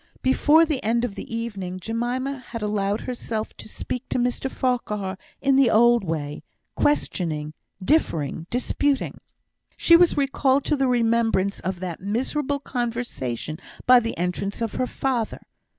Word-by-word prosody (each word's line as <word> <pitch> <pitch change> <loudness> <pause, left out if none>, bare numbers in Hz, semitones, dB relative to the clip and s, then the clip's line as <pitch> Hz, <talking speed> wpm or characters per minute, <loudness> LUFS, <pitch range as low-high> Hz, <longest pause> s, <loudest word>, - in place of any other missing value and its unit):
Before 300 +5 +5
the 300 -5 -2
end 235 +3 +1
of 230 - -5
the 200 - -8
evening, 200 -6 -4
Jemima 245 +6 -2
had 230 -3 -5
allowed 205 0 0
herself 230 -3 -4
to - - -9
speak 250 +3 -5
to - - 0
Mr 250 +2 0
Farquhar 210 -8 -1 0.3
in 275 -1 +4
the 270 -3 +5
old 235 +1 +5
way 150 -4 -3 0.3
questioning, 155 - 0 0.3
differing, 165 - +1
disputing. 270 +3 0 0.6
She 335 - +6
was 345 -2 +5
recalled 275 -1 +2
to 300 - +1
the 270 -2 +1
remembrance 230 -5 +2
of 185 -1 -4
that 180 -3 -4
miserable 260 +8 -1
conversation 230 - -3 0.3
by 250 0 +8
the 230 -1 -4
entrance 180 +3 -2
of 230 -2 -2
her 255 - -1
father. 245 -5 -2
235 Hz, 145 wpm, -24 LUFS, 195-260 Hz, 0.6 s, by